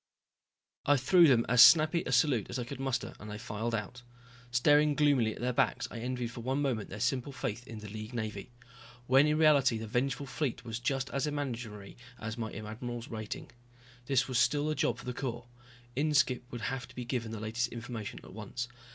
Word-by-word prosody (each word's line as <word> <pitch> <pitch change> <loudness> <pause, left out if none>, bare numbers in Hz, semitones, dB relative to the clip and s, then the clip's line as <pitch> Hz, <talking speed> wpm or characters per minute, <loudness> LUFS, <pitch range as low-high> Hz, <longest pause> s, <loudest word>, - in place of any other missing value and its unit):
I 145 0 +5
threw 170 +7 +6
them 120 -4 +4
as 125 0 +6
snappy 160 +3 +7
a - - -2
salute 125 -4 +3
as 120 - -3
I 125 - -2
could 125 +2 -7
muster 135 -2 -2
and 105 - -9
they 105 - -5
filed 110 +3 -3
out. 110 +3 -5 0.5
Staring 145 +4 +4
gloomily 140 -7 +3
at - - -10
their 125 +1 0
backs - - +1
I 115 - -6
envied 125 0 -3
for 120 - -8
one 130 +4 -1
moment 130 -7 -1
their 105 - -7
simple 125 +4 0
faith 120 -2 -4
in 115 - -8
the 105 - -8
League 110 +3 -7
Navy. 110 0 -4 0.5
When 135 +4 +5
in 150 0 +2
reality 145 -6 +5
the 110 - -5
vengeful 135 +5 -1
fleet 135 -3 -3
was 115 0 -4
just 135 +1 -1
as 140 +2 -1
imaginary 120 -8 -5 0.2
as 110 0 -4
my 110 -2 -4
admiral's 115 +4 -6
rating. 110 -2 -6 0.6
This 135 -1 +2
was 130 -2 +1
still 145 +5 +2
a - - -1
job - - +1
for - - -11
the 125 - -3
Corps. 120 -2 -4 0.5
Inskipp 140 -3 +2
would 120 - -6
have 125 +3 -3
to - - -17
be 125 - -5
given 120 -3 -3
the 110 - -5
latest 115 +3 -1
information 115 -2 -6
at - - -12
once. 110 +4 -5
125 Hz, 205 wpm, -31 LUFS, 115-135 Hz, 0.6 s, snappy